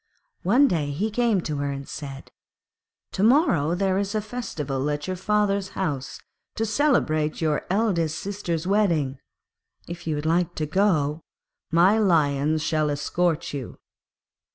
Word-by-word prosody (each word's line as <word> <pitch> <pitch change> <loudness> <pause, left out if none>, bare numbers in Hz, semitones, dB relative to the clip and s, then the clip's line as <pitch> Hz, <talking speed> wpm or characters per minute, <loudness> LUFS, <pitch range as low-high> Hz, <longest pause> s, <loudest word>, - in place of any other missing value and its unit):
One 245 +10 +4
day 155 - 0
he 195 +10 -2
came 225 -3 +2
to 150 -3 -3
her 140 0 -1
and 140 0 -6
said, 140 -2 -8 0.8
'To - - -3
morrow 205 - +3
there 190 0 +1
is 200 +1 -2
a - - +2
festival 150 - -3
at 145 0 -2
your 185 - -3
father's 200 0 0
house 145 -8 -3 0.4
to 225 - 0
celebrate 210 - +1
your 155 -2 -1
eldest 180 -6 +1
sister's 185 -5 -3
wedding; 170 -10 +1 0.7
if 170 0 -8
you 155 - 0
would 150 +1 -4
like 170 +2 +1
to 155 - -1
go 155 -3 +1 0.5
my 180 +6 +4
Lions 155 -5 +2
shall 155 -1 +1
escort 165 +3 -1
you.' 135 -4 -6
170 Hz, 145 wpm, -24 LUFS, 150-200 Hz, 0.8 s, One